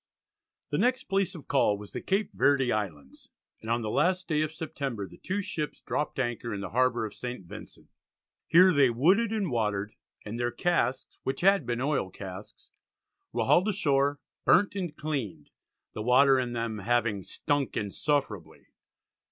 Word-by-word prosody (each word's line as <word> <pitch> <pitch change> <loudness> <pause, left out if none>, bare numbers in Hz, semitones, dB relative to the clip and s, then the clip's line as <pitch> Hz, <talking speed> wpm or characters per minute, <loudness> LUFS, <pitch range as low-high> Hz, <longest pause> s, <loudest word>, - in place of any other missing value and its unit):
The - - 0
next 255 +1 +2
place 195 -1 0
of 155 - -11
call 115 -7 +2
was 105 0 -11
the - - -4
Cape 200 +2 0
Verde 135 +4 +3
Islands 85 -10 -5 0.3
and 110 - -8
on 115 0 +1
the 105 - -2
last 180 +6 +1
day 155 -2 +1
of 155 0 -1
September 140 - -4
the - - -16
two 200 +2 -2
ships 155 -5 -4
dropped 150 - -3
anchor 120 -3 -2
in - - -4
the - - -6
harbour 125 -1 +2
of 105 - -7
St. 125 -6 -6
Vincent. - - -11 0.6
Here 185 +2 +6
they 140 -4 +5
wooded 185 - +3
and 205 -8 -1
watered, 105 -3 -1 0.3
and 110 +3 -5
their 120 0 +1
casks, 130 -4 -1
which 135 - -3
had 195 -7 +4
been 120 0 -1
oil 140 -8 0
casks, 95 +1 -10 0.6
were - - -1
hauled 180 +4 +4
ashore, 145 -8 +1 0.2
burnt 200 +2 +4
and 175 -6 -4
cleaned 115 - -4 0.4
the 110 - -5
water 130 +3 +5
in 125 -1 -2
them 115 -2 -3
having 115 -1 +1
"stunk 145 +8 -2
insufferably." 105 - -2
130 Hz, 170 wpm, -28 LUFS, 110-160 Hz, 0.6 s, Here